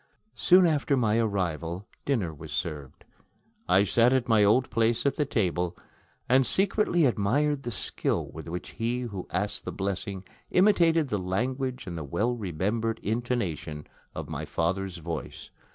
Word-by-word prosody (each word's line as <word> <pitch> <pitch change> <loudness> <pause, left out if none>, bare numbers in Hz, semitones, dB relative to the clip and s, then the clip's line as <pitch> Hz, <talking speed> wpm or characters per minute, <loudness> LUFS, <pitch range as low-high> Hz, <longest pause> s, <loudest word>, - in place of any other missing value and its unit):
Soon 185 0 +5
after 145 -4 +2
my 115 -2 +2
arrival, 90 -4 -2 0.2
dinner 105 - 0
was 75 +1 -10
served. 75 -3 -5 0.6
I 95 +2 +5
sat 115 +4 +4
at 130 -2 +1
my 110 -3 +5
old 125 +6 +3
place 115 +2 +1
at 140 - +2
the 150 - 0
table, 90 -7 0 0.5
and 130 +2 +5
secretly 190 - +2
admired 135 +6 +1
the 120 - -4
skill 105 - -1
with - - -9
which 90 +2 -5
he 120 +2 -2
who 100 -7 -5
asked 105 0 -2
the - - -4
blessing 95 0 -3 0.3
imitated 170 -6 +4
the 105 - 0
language 125 +8 -2
and 85 -3 -5
the - - -5
well 110 - 0
remembered 110 +3 -1
intonation 100 - -2 0.3
of - - -5
my - - -4
father's 95 +2 -2
voice. 85 0 -6
110 Hz, 150 wpm, -27 LUFS, 90-130 Hz, 0.6 s, Soon